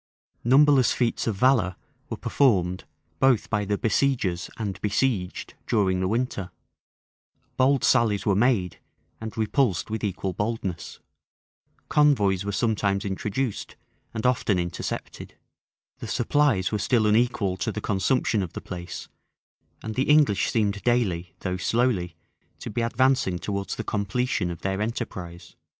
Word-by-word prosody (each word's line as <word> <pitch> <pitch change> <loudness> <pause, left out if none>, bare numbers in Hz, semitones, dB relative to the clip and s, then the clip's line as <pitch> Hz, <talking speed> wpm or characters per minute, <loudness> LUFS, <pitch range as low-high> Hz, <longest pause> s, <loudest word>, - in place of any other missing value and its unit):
Numberless 135 +1 +5
feats 120 -2 -1
of 110 - 0
valor 110 -5 +3 0.3
were - - -4
performed 90 -10 +1 0.3
both 130 -5 +3
by 105 -2 0
the 100 +1 -1
besiegers 110 -6 0
and 100 -4 -4
besieged 105 -3 -1
during 95 -4 +1
the 95 - 0
winter: 110 -3 -2 1.1
bold 135 +1 +3
sallies 110 -6 +3
were 100 - +3
made, 105 -5 +1 0.4
and 110 0 -7
repulsed 110 -3 0
with 110 -1 -3
equal 95 -2 -2
boldness: 100 -3 -4 0.9
convoys 105 -11 +3
were 100 - -3
sometimes 100 -1 0
introduced, 105 +4 -3 0.4
and 110 - -5
often 125 -6 +2
intercepted: 85 -1 -5 0.6
the - - -6
supplies 120 -6 +1
were 105 - -1
still 110 +2 +2
unequal 105 -3 +2
to 110 - -2
the 105 - -4
consumption 105 +2 +1
of 90 -4 -5
the - - -5
place: 90 -1 -7 0.8
and 110 - -4
the 130 +5 -1
English 150 -9 +4
seemed 105 -3 0
daily, 95 -9 0
though 95 -1 -2
slowly, 110 -4 0 0.4
to - - -7
be 120 - -2
advancing 115 -5 +2
towards 100 +1 -3
the - - -4
completion 105 -1 -1
of 85 -2 -6
their 95 +1 -2
enterprise. 95 -6 -5
105 Hz, 135 wpm, -25 LUFS, 95-125 Hz, 1.1 s, Numberless